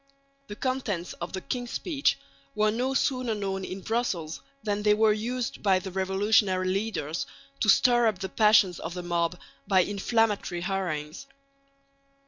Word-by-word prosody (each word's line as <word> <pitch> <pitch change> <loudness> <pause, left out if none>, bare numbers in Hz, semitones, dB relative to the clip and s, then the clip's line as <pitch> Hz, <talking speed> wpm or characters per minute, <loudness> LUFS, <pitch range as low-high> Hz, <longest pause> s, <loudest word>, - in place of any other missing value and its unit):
The 205 - -7
contents 220 -8 -2
of 170 - -4
the 190 - -3
king's 245 +2 -4
speech 295 -1 0 0.4
were 215 0 +3
no 255 +4 -1
sooner 255 -4 0
known 195 -2 -3
in 185 +1 -6
Brussels 185 -9 -2 0.2
than 205 -1 -1
they 210 0 +4
were 215 0 +4
used 235 +3 -3
by 195 -2 +4
the 185 +1 -5
revolutionary 190 0 +2
leaders 195 - -2 0.3
to 215 - +1
stir 240 +2 +5
up 215 -4 0
the 190 +1 -4
passions 210 -4 +4
of 170 +2 -6
the 180 - -5
mob 175 0 0 0.3
by 190 -2 +5
inflammatory 205 -2 0
harangues. 175 - -3
205 Hz, 150 wpm, -27 LUFS, 185-225 Hz, 0.4 s, stir